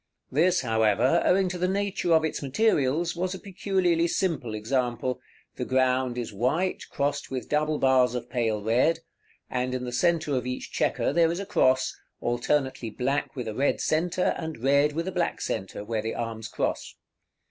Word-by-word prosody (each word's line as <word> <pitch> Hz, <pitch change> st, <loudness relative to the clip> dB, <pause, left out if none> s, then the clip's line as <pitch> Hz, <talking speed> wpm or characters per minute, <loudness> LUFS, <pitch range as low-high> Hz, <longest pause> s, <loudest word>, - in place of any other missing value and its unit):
This, 175 Hz, +6 st, +3 dB
however, 115 Hz, +5 st, +2 dB
owing 190 Hz, +1 st, +3 dB
to 180 Hz, 0 st, -5 dB
the 180 Hz, -, +1 dB
nature 195 Hz, -2 st, -1 dB
of 160 Hz, 0 st, +4 dB
its 160 Hz, -, -3 dB
materials, 150 Hz, -, +1 dB
was 185 Hz, +2 st, -2 dB
a -, -, -8 dB
peculiarly 185 Hz, -4 st, +1 dB
simple 165 Hz, -, -1 dB
example; 120 Hz, +2 st, -1 dB, 0.4 s
the -, -, -2 dB
ground 130 Hz, -1 st, +1 dB
is 120 Hz, -3 st, -4 dB
white, 145 Hz, -, 0 dB
crossed 140 Hz, 0 st, -2 dB
with 130 Hz, -2 st, -4 dB
double 150 Hz, 0 st, +1 dB
bars 130 Hz, -2 st, +3 dB
of 125 Hz, -, -4 dB
pale 115 Hz, -4 st, -1 dB
red, 125 Hz, +9 st, +2 dB, 0.5 s
and 125 Hz, 0 st, -2 dB
in 125 Hz, -, -3 dB
the 125 Hz, -, -4 dB
centre 155 Hz, +3 st, +1 dB
of 125 Hz, -1 st, -2 dB
each 125 Hz, -, -5 dB
chequer -, -, 0 dB
there 165 Hz, 0 st, +4 dB
is 170 Hz, -, -3 dB
a 200 Hz, -, -4 dB
cross, 130 Hz, -10 st, +2 dB, 0.2 s
alternately 120 Hz, 0 st, 0 dB
black 135 Hz, +8 st, -2 dB
with 125 Hz, -4 st, -4 dB
a 110 Hz, -, -3 dB
red 140 Hz, +6 st, +1 dB
centre 175 Hz, +3 st, +1 dB
and 160 Hz, -7 st, -6 dB
red 140 Hz, +2 st, +4 dB
with 165 Hz, +3 st, -2 dB
a -, -, -1 dB
black 175 Hz, -2 st, -1 dB
centre 95 Hz, +2 st, -4 dB
where 110 Hz, 0 st, -1 dB
the 110 Hz, +1 st, -3 dB
arms 115 Hz, -1 st, -4 dB
cross. -, -, -3 dB
135 Hz, 180 wpm, -27 LUFS, 125-170 Hz, 0.5 s, of